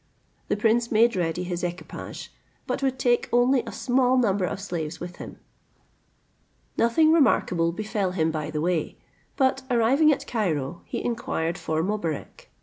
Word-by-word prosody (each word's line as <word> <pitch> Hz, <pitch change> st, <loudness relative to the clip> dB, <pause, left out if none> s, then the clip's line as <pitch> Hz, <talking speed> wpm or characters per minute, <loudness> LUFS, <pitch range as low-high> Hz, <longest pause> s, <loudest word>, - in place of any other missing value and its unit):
The -, -, 0 dB
prince 230 Hz, +2 st, +2 dB
made 230 Hz, +1 st, +4 dB
ready 175 Hz, -1 st, -1 dB
his 175 Hz, -1 st, -4 dB
equipage, 175 Hz, +1 st, -6 dB, 0.3 s
but -, -, -2 dB
would 265 Hz, -1 st, 0 dB
take 245 Hz, -1 st, +1 dB
only 245 Hz, +2 st, +4 dB
a -, -, -4 dB
small 255 Hz, 0 st, +2 dB
number 200 Hz, -6 st, +2 dB
of 185 Hz, -, -4 dB
slaves 165 Hz, -5 st, -4 dB
with 175 Hz, 0 st, -8 dB
him. -, -, -9 dB, 1.4 s
Nothing 310 Hz, +8 st, +4 dB
remarkable 180 Hz, -, +3 dB
befell 210 Hz, 0 st, -2 dB
him 165 Hz, -3 st, 0 dB
by 155 Hz, -1 st, -3 dB
the 150 Hz, -, -3 dB
way, 170 Hz, -2 st, -1 dB, 0.4 s
but 265 Hz, -1 st, +2 dB
arriving 255 Hz, +6 st, +4 dB
at 285 Hz, -, -1 dB
Cairo, 170 Hz, -, -2 dB
he -, -, -5 dB
inquired 185 Hz, -8 st, -2 dB
for 160 Hz, 0 st, -1 dB
Mobarec. 180 Hz, -6 st, -4 dB
205 Hz, 150 wpm, -25 LUFS, 170-245 Hz, 1.4 s, made